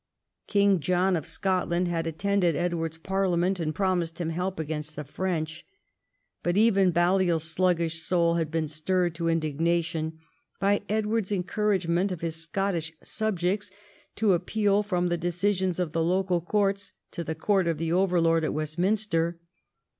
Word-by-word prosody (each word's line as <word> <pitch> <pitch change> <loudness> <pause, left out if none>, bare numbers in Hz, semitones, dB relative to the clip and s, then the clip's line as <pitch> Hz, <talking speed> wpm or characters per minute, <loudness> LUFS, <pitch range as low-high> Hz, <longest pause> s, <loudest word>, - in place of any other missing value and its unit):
King 200 -2 +3
John 180 +4 +2
of 160 -1 -3
Scotland 180 0 0
had 165 -1 -1
attended 180 0 +1
Edward's 165 -1 -2
parliament 185 +1 0
and 155 -2 -2
promised 175 -3 0
him 165 -2 -2
help 180 +2 -3
against 155 0 -4
the 150 - -5
French. 160 +1 -3 0.8
But 175 +2 0
even 200 -4 +4
Balliol's 175 -1 +2
sluggish 165 -1 +1
soul 170 0 +2
had 165 -2 0
been 160 0 -1
stirred 175 +3 0
to 165 +1 -3
indignation 165 0 0 0.4
by 200 +1 +2
Edward's 215 -1 0
encouragement 190 -1 0
of 180 - -5
his 165 -1 -2
Scottish 165 -1 -2
subjects 205 -1 -1 0.5
to 210 -3 +3
appeal 200 +3 +1
from 180 -4 0
the 175 -1 -1
decisions 180 +1 0
of 175 -4 -1
the 165 - 0
local 180 0 +1
courts 200 +2 0 0.2
to 170 - -4
the 160 0 -4
court 190 +3 +1
of 165 -2 0
the 165 +1 -1
overlord 170 -3 +3
at 155 - -1
West 155 +1 -3
minster. 180 -4 +1
175 Hz, 150 wpm, -27 LUFS, 165-190 Hz, 0.8 s, even